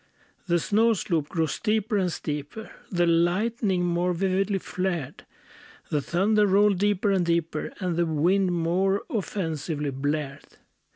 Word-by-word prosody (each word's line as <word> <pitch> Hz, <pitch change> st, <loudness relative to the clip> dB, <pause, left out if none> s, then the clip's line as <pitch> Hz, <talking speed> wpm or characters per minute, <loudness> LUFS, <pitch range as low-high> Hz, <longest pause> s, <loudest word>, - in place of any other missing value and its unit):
The 175 Hz, -1 st, +3 dB
snow 220 Hz, +7 st, +3 dB
slope 165 Hz, -7 st, -1 dB
grew 165 Hz, -1 st, 0 dB
steeper 215 Hz, -, -1 dB
and 185 Hz, -3 st, +1 dB
steeper; 150 Hz, +8 st, -5 dB, 0.2 s
The 175 Hz, -2 st, +2 dB
lightning 180 Hz, +3 st, +1 dB
more 175 Hz, +1 st, 0 dB
vividly 195 Hz, +2 st, 0 dB
flared; 180 Hz, -6 st, -4 dB, 0.6 s
The 150 Hz, -, +1 dB
thunder 205 Hz, +7 st, +2 dB
rolled 200 Hz, 0 st, +3 dB
deeper 205 Hz, 0 st, +1 dB
and 190 Hz, -2 st, +2 dB
deeper; 170 Hz, -2 st, -1 dB
And 180 Hz, -2 st, -1 dB
the 170 Hz, -1 st, +2 dB
wind 180 Hz, +5 st, +2 dB
more 180 Hz, +4 st, +1 dB
offensively 160 Hz, -8 st, -3 dB
blared. 145 Hz, +1 st, -4 dB
180 Hz, 130 wpm, -26 LUFS, 165-200 Hz, 0.6 s, The